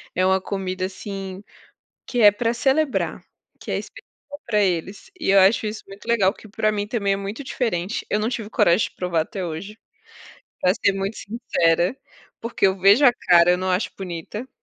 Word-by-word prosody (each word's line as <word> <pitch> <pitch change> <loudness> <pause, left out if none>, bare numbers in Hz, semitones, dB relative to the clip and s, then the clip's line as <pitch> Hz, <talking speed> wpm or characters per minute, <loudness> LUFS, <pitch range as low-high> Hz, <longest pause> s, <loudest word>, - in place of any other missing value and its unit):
é 185 - +2
uma 190 0 +2
comida, 185 -1 -3
assim, 195 0 -7 0.6
que 245 - -2
é 205 -1 +9
pra 230 +3 -1
celebrar, 275 +4 0 0.4
que - - -8
é - - 0
especial - - -10 0.4
pra 210 -3 +1
eles 190 - -2
e - - +1
eu 195 - +6
acho 200 +3 +4
isso 215 +1 -5
muito 195 +1 -13
legal, 205 -5 +3
que 220 - -15
pra 215 +1 0
mim 205 -1 -2
também 210 -4 0
é - - +1
muito 200 +7 -6
diferente. 215 -6 -2
Eu 210 - +2
não 215 +2 0
tive 220 -4 -5
coragem 175 +1 +3
de - - -30
provar 180 -3 0
até 185 +4 -4
hoje, 195 +7 -7 0.8
pra 180 - +3
ser 205 -3 +2
muito 195 +2 -3
sincera, 195 -3 0 0.4
porque 230 -3 +1
eu 190 0 +1
vejo 200 +9 +5
a 245 - +7
cara, 175 -6 +4
eu 180 - +3
não 185 0 -1
acho 180 +3 0
bonita. 190 +6 -6
200 Hz, 195 wpm, -22 LUFS, 185-225 Hz, 0.8 s, é